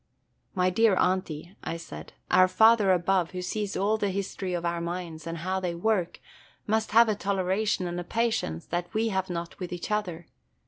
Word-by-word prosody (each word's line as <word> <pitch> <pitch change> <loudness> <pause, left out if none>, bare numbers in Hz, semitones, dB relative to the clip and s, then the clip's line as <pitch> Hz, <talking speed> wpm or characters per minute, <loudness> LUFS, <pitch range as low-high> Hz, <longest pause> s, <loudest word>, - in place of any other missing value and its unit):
"My 185 0 +2
dear 220 +1 +4
Aunty," 180 -1 -1
I 165 - -3
said, 165 - -10 0.2
"our 185 - +6
Father 220 0 +5
above, 180 0 +1
who 180 - -3
sees 205 +1 -3
all 205 +3 +2
the 205 - 0
history 190 -1 -3
of 175 0 -3
our 170 0 -1
minds, 170 -2 -5
and 165 0 -4
how 185 +3 -2
they 180 -2 -2
work, 185 -1 0 0.5
must 220 +1 0
have 230 +2 +6
a 215 - +2
toleration 195 0 0
and 175 0 -3
a - - -4
patience 220 - -1
that 175 +1 -3
we 225 +1 +2
have 190 -2 -1
not 170 -1 -5
with 180 -2 -5
each 180 +4 -5
other. 180 -6 -2
185 Hz, 190 wpm, -27 LUFS, 175-205 Hz, 0.5 s, our